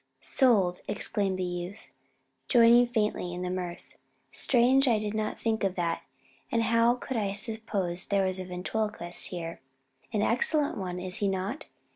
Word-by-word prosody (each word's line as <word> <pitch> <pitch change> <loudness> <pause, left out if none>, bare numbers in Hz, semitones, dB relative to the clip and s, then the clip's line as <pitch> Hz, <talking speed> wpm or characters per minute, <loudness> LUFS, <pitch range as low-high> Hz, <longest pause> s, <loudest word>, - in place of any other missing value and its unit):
"Sold!" 195 - +3
exclaimed 200 -2 0
the 185 - -2
youth, 180 +3 -6 0.6
joining 240 0 +6
faintly 210 -6 -1
in 180 - -5
the 180 - -2
mirth. 180 -2 -5 0.4
"Strange 260 +2 +3
I 230 -3 +4
did 210 0 -3
not 215 0 -3
think 225 -1 -1
of 190 -1 0
that, 170 -2 -1 0.5
though 230 - +1
how 230 +1 +3
could 250 0 -5
I 200 -3 -1
suppose 200 -5 -1
there 200 -1 +2
was 185 0 0
a 185 - -5
ventriloquist 180 0 -2
here?" 170 -2 -6 0.5
"An 210 -2 0
excellent 285 +6 +2
one, 180 -2 -4
is 180 0 -1
he 205 - 0
not? 195 +9 -3
205 Hz, 160 wpm, -28 LUFS, 180-230 Hz, 0.6 s, joining